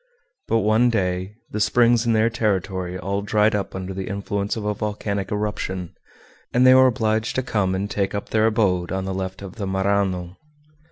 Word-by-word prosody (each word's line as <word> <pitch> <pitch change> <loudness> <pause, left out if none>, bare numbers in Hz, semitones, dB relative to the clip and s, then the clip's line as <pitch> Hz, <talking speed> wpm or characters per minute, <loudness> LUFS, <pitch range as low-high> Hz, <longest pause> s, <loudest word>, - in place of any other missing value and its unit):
But 115 - +2
one 110 +3 +3
day 95 -2 -1 0.2
the 105 - -3
springs 120 +2 +3
in 115 - +3
their 110 +1 +3
territory 95 -5 -1
all 100 +2 -2
dried 105 +1 +2
up 100 -2 -2
under 95 0 -5
the 95 0 -5
influence 100 0 -2
of 105 - -4
a 105 - 0
volcanic 100 -2 -3
eruption, 105 -4 -3 0.6
and 125 +1 +3
they 130 - +8
were 130 0 +7
obliged 110 -2 0
to 130 - 0
come 95 -6 0
and 100 +2 -2
take 100 -1 -2
up 100 - -4
their 110 0 +3
abode 95 -6 +1
on 95 0 -2
the 95 - -3
left 95 0 -5
of 95 +1 -9
the 100 -3 -3
Marânon. 95 -2 0
100 Hz, 190 wpm, -22 LUFS, 95-110 Hz, 0.6 s, they